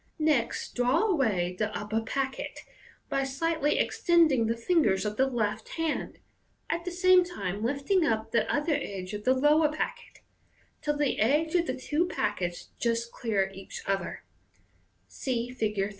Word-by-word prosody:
Next 305 -7 0
draw 245 +1 +2
away 220 - +1
the 215 -1 +1
upper 215 +2 -2
packet, 265 +4 -3 0.5
by 275 - 0
slightly 295 +3 0
extending 315 -10 +3
the 230 +1 0
fingers 230 - +2
of 210 0 -2
the 265 +4 +3
left 220 -4 -2
hand, 325 -2 -2 0.5
at 340 +1 -2
the 360 - -3
same 365 +1 +5
time 205 - -4
lifting 280 +9 +1
up 225 -5 0
the 235 - +1
outer 295 +2 +1
edge 195 -9 -4
of 210 0 -6
the 260 +1 +4
lower 300 +3 +4
packet, 480 +10 -5 0.6
till 295 -1 -1
the 290 -2 0
edges 300 +8 +2
of 345 -2 +2
the 255 - -2
two 300 +6 0
packets 185 - -2
just 235 0 0
clear 200 -5 -1
each 195 0 -9
other 195 - -2 0.8
(see 240 - -3
Fig. 215 -5 -2
255 Hz, 155 wpm, -28 LUFS, 215-310 Hz, 0.8 s, same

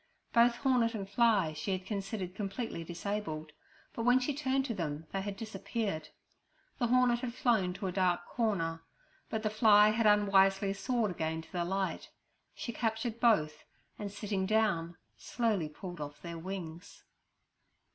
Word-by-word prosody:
Both 235 0 +5
hornet 245 -3 +2
and 195 -2 -4
fly 205 -7 +3
she 155 +5 -2
had 185 0 -4
considered 195 -2 -4
completely 200 -2 -4
disabled, 170 -3 -4 0.4
but 235 - -4
when 245 +2 +5
she 255 +3 -1
turned 270 -1 0
to 235 - -2
them 160 -5 -4
they 195 - -2
had 200 0 -5
disappeared. 200 -6 -3 0.7
The 240 - +2
hornet 245 0 +4
had 240 -1 -4
flown 215 -9 +2
to 190 - -6
a 185 - -1
dark 180 -1 +1
corner, 170 -9 -1 0.5
but 220 0 -2
the 215 - 0
fly 215 -1 +6
had 220 0 +2
unwisely 195 -1 +4
soared 225 0 0
again 160 -1 -2
to - - -19
the 175 -1 -1
light. 190 +2 -2 0.5
She 235 - -5
captured 225 +1 -2
both, 155 -11 +2 0.4
and, 205 -1 -4
sitting 200 -2 -2
down, 190 -6 +1 0.2
slowly 215 -10 -1
pulled 175 +1 -8
off 145 0 -6
their 170 -1 -6
wings. 175 -1 -7
200 Hz, 155 wpm, -32 LUFS, 175-230 Hz, 0.7 s, fly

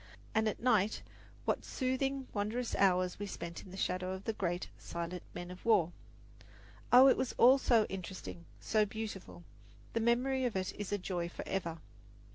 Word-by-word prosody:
And 220 0 +2
at - - -5
night 220 -4 +2 0.4
what - - 0
soothing, 265 0 -1
wondrous 220 +4 -2
hours 185 -2 +2
we 205 - -3
spent 170 -3 -6
in - - -13
the 190 - -9
shadow 185 0 -1
of 190 +1 -7
the 225 - -1
great, 175 -3 -2
silent 170 +1 -5
men 175 0 -6
of 180 - -11
war. 175 -7 +4 1.0
Oh, 255 +2 +9
it 265 - +5
was 260 - -2
all 260 +3 +7
so 230 -5 +4
interesting, 185 -2 -7
so 215 -1 +2
beautiful! 210 -4 -6 0.5
The 230 - +1
memory 250 +3 +2
of 240 - -1
it 185 -1 -1
is 205 -1 -6
a 205 - +1
joy 180 -3 -3
forever. 170 -2 -3
205 Hz, 170 wpm, -34 LUFS, 180-235 Hz, 1.0 s, Oh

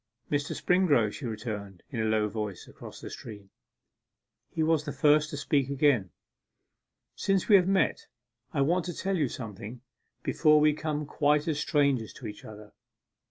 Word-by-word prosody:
'Mr. 145 -1 -1
Springrove,' 150 - +3
she 135 - -6
returned, 105 -4 -6
in 120 - -4
a 110 - +1
low 110 -1 +2
voice, 105 -3 -5
across - - -11
the - - -8
stream. 105 -3 -10 1.0
He 160 - -1
was 160 -1 +2
the 145 - -4
first 150 0 +3
to 145 - -5
speak 140 -2 0
again. 135 -8 +2 1.1
'Since 195 -2 0
we 210 - +7
have 185 -2 +5
met, 195 0 +1 0.4
I 140 - 0
want 170 +5 +2
to 175 -2 -5
tell 195 +1 -1
you 155 -6 +1
something, 115 0 -8 0.4
before 155 -1 +4
we 150 0 +5
become 150 0 -3
quite 150 +1 +1
as 155 -2 0
strangers 140 -7 +1
to 125 - -11
each 105 -1 -7
other. 105 -1 -12
145 Hz, 165 wpm, -28 LUFS, 110-155 Hz, 1.1 s, we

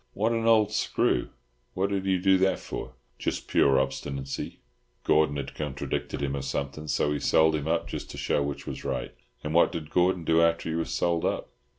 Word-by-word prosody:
"What 110 +3 +1
an 115 -1 0
old 110 -2 +5
screw! 105 - +1 0.5
What 95 +2 0
did 95 -1 -1
he 95 -1 +3
do 95 +1 +4
that 95 0 +3
for?" 65 0 -7 0.2
"Just - - -3
pure 70 -1 +4
obstinacy—Gordon 65 +1 -2
had 70 -1 -5
contradicted 70 -1 -3
him 70 0 -1
or 70 - -3
something, 70 +3 -4
so 75 - +1
he 75 - -2
sold 80 +2 +4
him 75 -1 -2
up 80 - 0
just - - -6
to - - -8
show - - 0
which 70 0 -4
was - - -6
right." - - -3 0.3
"And 75 - -3
what 85 - +5
did 80 -2 -6
Gordon 90 -1 +2
do 80 +1 +3
after 85 0 +2
he 80 - -1
was 80 0 -2
sold 85 -1 0
up?" - - -2
80 Hz, 200 wpm, -27 LUFS, 70-90 Hz, 0.5 s, old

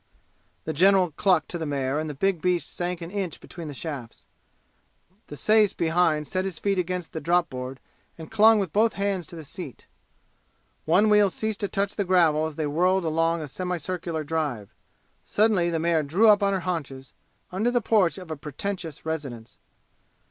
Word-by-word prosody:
The 160 - -3
general 185 +1 +4
clucked 175 0 +2
to 175 - -4
the 160 - -3
mare 140 0 -1
and 155 0 -3
the 145 - -6
big 190 +2 0
beast 180 -4 0
sank 175 0 -3
an 165 +1 -7
inch 190 -5 -3
between 170 -3 -9
the 145 - -6
shafts. 140 -6 -7 1.0
The 145 - -9
sais 215 +1 +4
behind 165 -2 +1
set 185 +4 -2
his 190 -4 -4
feet 195 +1 0
against 180 -1 -3
the 160 - -4
drop 175 -1 +1
board 130 +1 -6 0.4
and 160 +3 -10
clung 225 0 +6
with 195 -6 -2
both 220 +2 +3
hands 195 -4 -2
to - - -11
the 160 -2 -9
seat. 150 -3 -9 1.0
One 185 +7 +4
wheel 210 -1 +5
ceased 220 +2 -3
to 200 - -1
touch 200 +1 -2
the 205 - +1
gravel 165 -4 +3
as 155 - -8
they 155 - -2
whirled 180 +5 +1
along 165 +1 +1
a - - -6
semicircular 175 0 -3
drive. 145 -9 -3 0.5
Suddenly 205 -5 +2
the 165 - -1
mare 165 0 +2
drew 175 +10 +3
up 205 0 +6
on 200 0 +2
her 190 - -1
haunches, 140 -7 -5 0.4
under 200 +6 0
the 245 0 +2
porch 205 -6 +2
of 180 -4 -9
a - - -2
pretentious 160 +2 -6
residence. 135 -8 -5
170 Hz, 185 wpm, -25 LUFS, 155-195 Hz, 1.0 s, clung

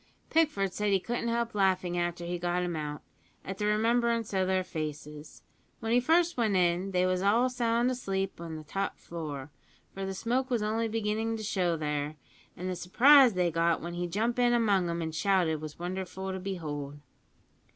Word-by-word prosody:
"Pickford 295 - +2
said 210 0 -1
he 195 - +4
couldn't 235 +4 -3
help 235 0 -1
laughing 185 -3 +1
after 175 0 -2
he 175 0 -3
got 175 +1 0
'em 175 -1 -2
out, 150 -1 -5 0.4
at 195 0 -6
the 210 - 0
remembrance 230 +1 +1
o' 190 -1 +2
their 185 0 +1
faces. 150 -3 -7 0.4
When 225 0 -3
he 245 - +5
first 330 +5 +2
went 220 -4 +2
in 180 +1 +2
they 180 -1 +2
was 185 0 +1
all 230 +6 +3
sound 240 0 +1
asleep 195 -7 -3
in 165 -1 -6
the 155 - -7
top 195 +6 -3
floor, 150 -4 -7 0.4
for 195 - -5
the 190 0 -3
smoke 250 +6 -1
was 240 -4 0
only 225 +2 0
beginnin' 225 +1 -1
to 215 - -6
show 180 -5 0
there, 150 0 -2 0.4
an' 180 - -6
the 185 - -2
surprise 245 +7 +6
they 180 -1 +2
got 165 +1 +2
when 170 +1 -6
he 175 0 -2
jump 225 +7 -1
in 245 -1 +4
among 200 -7 +2
'em 170 0 -2
an' 160 - -3
shouted 165 -3 +1
was 155 -1 -7
wonderful 185 +2 -4
to 190 - -4
behold." 150 -7 -5
190 Hz, 195 wpm, -29 LUFS, 170-225 Hz, 0.4 s, surprise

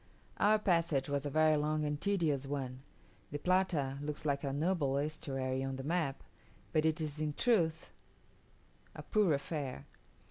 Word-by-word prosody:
Our 215 +1 +5
passage 165 -9 +1
was 140 0 -1
a - - -2
very 155 +2 +4
long 150 +1 0
and 150 0 -2
tedious 160 -9 +1
one. 135 -2 -4 0.5
The 145 - -3
Plata 160 -5 +1
looks 150 +1 -5
like 140 -1 0
a 140 - -1
noble 145 -2 +1
estuary 135 -3 -2
on 135 0 -3
the 135 - -6
map; 155 -2 -1 0.5
but 155 0 +3
is 155 -2 -2
in 155 -1 -1
truth 165 -7 +1 1.0
a - - -7
poor 210 -5 +2
affair. 140 - -3
150 Hz, 150 wpm, -34 LUFS, 140-165 Hz, 1.0 s, Our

